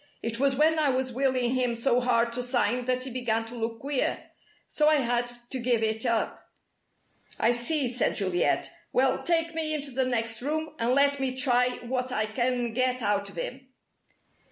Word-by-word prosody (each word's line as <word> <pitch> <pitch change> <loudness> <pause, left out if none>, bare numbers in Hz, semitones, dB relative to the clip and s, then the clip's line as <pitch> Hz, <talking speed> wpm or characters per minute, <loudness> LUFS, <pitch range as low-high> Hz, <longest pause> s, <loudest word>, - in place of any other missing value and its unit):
It 230 0 -3
was 275 0 +3
when 315 +3 +3
I 300 -2 +3
was 260 -1 -1
willing 255 -1 +1
him 250 -2 0
so 240 +1 +2
hard 235 -1 +2
to 250 - -2
sign 245 -1 0
that 255 0 0
he 260 - -7
began 230 -2 -1
to 230 +2 -9
look 225 -1 -3
queer. 275 -1 -2 0.4
So 300 - +1
I 310 - +6
had 245 -3 0 0.2
to 260 - -2
give 240 -2 +1
it 220 +2 -1
up." 230 -1 -1 0.9
"I 230 - +4
see," 255 +4 0
said 245 +1 +1
Juliet. 185 -4 +1 0.2
"Well, 260 +1 +2
take 330 -1 0
me 315 -1 0
into 285 -2 -5
the 260 +1 0
next 230 -2 -1
room, 310 +3 -2
and 235 +2 +2
let 280 0 +3
me 260 -1 -1
try 250 -1 +2
what 250 +1 -2
I 215 -3 0
can 240 +1 -1
get 255 0 0
out 200 -1 0
of - - -14
him!" 260 +10 -6
250 Hz, 190 wpm, -27 LUFS, 235-270 Hz, 0.9 s, I